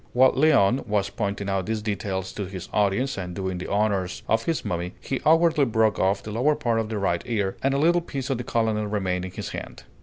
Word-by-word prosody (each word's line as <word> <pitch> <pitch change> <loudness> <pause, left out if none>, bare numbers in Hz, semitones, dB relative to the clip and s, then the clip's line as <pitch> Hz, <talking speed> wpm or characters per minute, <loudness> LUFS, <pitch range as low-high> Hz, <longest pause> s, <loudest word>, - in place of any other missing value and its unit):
While 130 +1 +5
Léon 130 -5 +3
was 105 -2 0
pointing 100 -2 -3
out 95 -1 -1
these 110 -1 -2
details 95 -3 -3
to 100 -3 -4
his 95 -2 -8
audience 105 +4 +1
and 90 -2 -5
doing 95 -2 -3
the - - -5
honors 100 -3 0
of 110 0 +1
his 165 -2 -1
mummy, 85 0 -3
he 135 - -3
awkwardly 160 -2 +4
broke 110 -4 +2
off 100 +1 +1
the 105 - -6
lower 130 +8 +2
part 120 -6 0
of 110 -1 -2
the 110 - -2
right 95 -4 0
ear, 105 -5 -1
and 135 +1 +1
a - - +2
little 170 +4 +3
piece 140 -5 -4
of 130 - -1
the - - -3
colonel 110 -3 0
remained 95 -3 -1
in 95 - -7
his - - -5
hand. - - -7
105 Hz, 235 wpm, -25 LUFS, 95-130 Hz, -, While